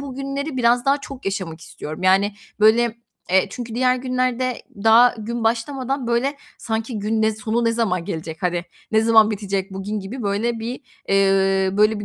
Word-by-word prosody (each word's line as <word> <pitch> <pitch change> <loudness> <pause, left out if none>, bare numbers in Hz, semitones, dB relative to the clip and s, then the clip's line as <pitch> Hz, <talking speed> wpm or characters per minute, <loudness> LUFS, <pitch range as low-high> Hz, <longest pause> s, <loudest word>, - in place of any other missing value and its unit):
bugünleri 275 +1 -4
biraz 240 0 +3
daha 275 +1 +3
çok 275 -1 -9
yaşamak 185 -5 -3
istiyorum. 155 +2 -8
Yani, 195 +2 +3 0.3
böyle, 230 +2 +4 0.3
eee, 190 +1 +4
çünkü 235 -2 -6
diğer 255 +1 +2
günlerde 255 -1 -1 0.2
daha 235 +2 +6
gün 230 +2 -4
başlamadan, 255 +3 -1
böyle, 245 +5 0 0.2
sanki, 225 0 -3
"Gün 220 +2 0
ne 220 0 +3
sonu 220 +2 -1
ne 230 - +2
zaman 195 -7 0
gelecek, 160 0 -6
hani, 175 -1 0 0.3
ne 220 - +5
zaman 225 -1 +5
bitecek 195 -2 -3
bugün?" 200 +2 -4
gibi 225 +7 -7
böyle 220 +3 -1
bir, 240 +4 -5 0.3
eee, 195 -1 +3
böyle, 215 0 +3
bir 205 - -5
225 Hz, 170 wpm, -21 LUFS, 195-245 Hz, 0.3 s, daha